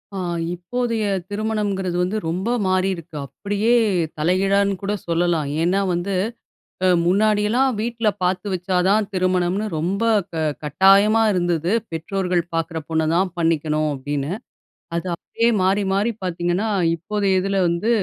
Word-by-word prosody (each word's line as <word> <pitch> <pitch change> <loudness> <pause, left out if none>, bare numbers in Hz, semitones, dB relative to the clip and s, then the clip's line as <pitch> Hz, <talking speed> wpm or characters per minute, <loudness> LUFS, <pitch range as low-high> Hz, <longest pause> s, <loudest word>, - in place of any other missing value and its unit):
அ, - - -3 0.3
இப்போதைய 230 +5 -2 0.3
திருமணம்ங்கிறது 205 -4 -1
வந்து, 185 +4 0
ரொம்ப 185 +6 -2 0.2
மாறியிருக்கு. 185 -3 -1
அப்படியே 205 - -1 0.4
தலைகீழானு 195 +5 +2
கூட 200 +1 -1
சொல்லலாம். 170 -2 +1 0.2
ஏன்னா 180 +4 +2
வந்து, 175 +3 -2 0.7
அ - - +5 0.2
முன்னாடியெல்லாம் 215 +6 +2
வீட்ல 230 0 -1 0.2
பாத்து 180 +2 0
வச்சா 180 0 -1
தான் 205 +1 +3
திருமணம்னு, 185 +2 +1
ரொம்ப 185 +7 -1 0.3
க - - -36 0.3
கட்டாயமா 195 +8 +5
இருந்தது. 175 0 0 0.2
பெற்றோர்கள் 180 +2 -1
பாக்குற 165 0 -2
பொண்ண 160 -1 +1
தான் 185 +1 +1
பண்ணிக்கணும், 155 -2 +1
அப்படின்னு. 145 +2 -3 0.7
அது 170 - -4
அப்படியே 230 +6 0
மாறி 195 +2 +2
மாறி 205 +4 +1
பாத்தீங்கன்னா, 175 +4 -1 0.3
இப்போதைய 195 +2 0
இதில 195 +1 -1
வந்து 170 +6 0
185 Hz, 125 wpm, -21 LUFS, 170-205 Hz, 0.7 s, அ